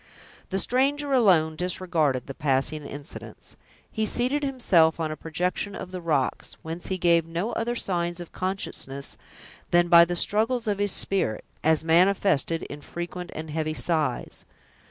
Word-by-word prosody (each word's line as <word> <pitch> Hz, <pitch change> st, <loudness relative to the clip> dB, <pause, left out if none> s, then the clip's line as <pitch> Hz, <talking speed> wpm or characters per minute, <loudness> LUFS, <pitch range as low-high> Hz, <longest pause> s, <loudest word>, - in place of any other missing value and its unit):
The 190 Hz, -, -1 dB
stranger 275 Hz, +6 st, +1 dB
alone 175 Hz, -11 st, +4 dB
disregarded 165 Hz, -6 st, 0 dB
the 135 Hz, -, -7 dB
passing 140 Hz, +2 st, 0 dB
incidents. 145 Hz, +2 st, -9 dB, 0.4 s
He 220 Hz, -1 st, -1 dB
seated 255 Hz, +6 st, 0 dB
himself 190 Hz, -, +3 dB
on 160 Hz, -1 st, -1 dB
a -, -, -3 dB
projection 180 Hz, +6 st, -2 dB
of 185 Hz, -, -7 dB
the 185 Hz, -1 st, -5 dB
rocks, 150 Hz, -6 st, -1 dB
whence 165 Hz, +2 st, -5 dB
he 190 Hz, -, -1 dB
gave 170 Hz, -2 st, +4 dB
no 170 Hz, +7 st, -2 dB
other 240 Hz, +1 st, -2 dB
signs 175 Hz, -5 st, -2 dB
of 175 Hz, -, -8 dB
consciousness 180 Hz, -7 st, -4 dB, 0.5 s
than 175 Hz, 0 st, +3 dB
by 170 Hz, 0 st, +9 dB
the 175 Hz, +1 st, -3 dB
struggles 225 Hz, +7 st, +1 dB
of 205 Hz, -2 st, -1 dB
his 205 Hz, -1 st, +1 dB
spirit, 150 Hz, -, -1 dB, 0.2 s
as 160 Hz, 0 st, +3 dB
manifested 170 Hz, -2 st, +3 dB
in 145 Hz, +1 st, -8 dB
frequent 175 Hz, +3 st, -6 dB
and 155 Hz, 0 st, -6 dB
heavy 155 Hz, 0 st, -2 dB
sighs. 155 Hz, -8 st, -1 dB
175 Hz, 155 wpm, -26 LUFS, 160-200 Hz, 0.5 s, by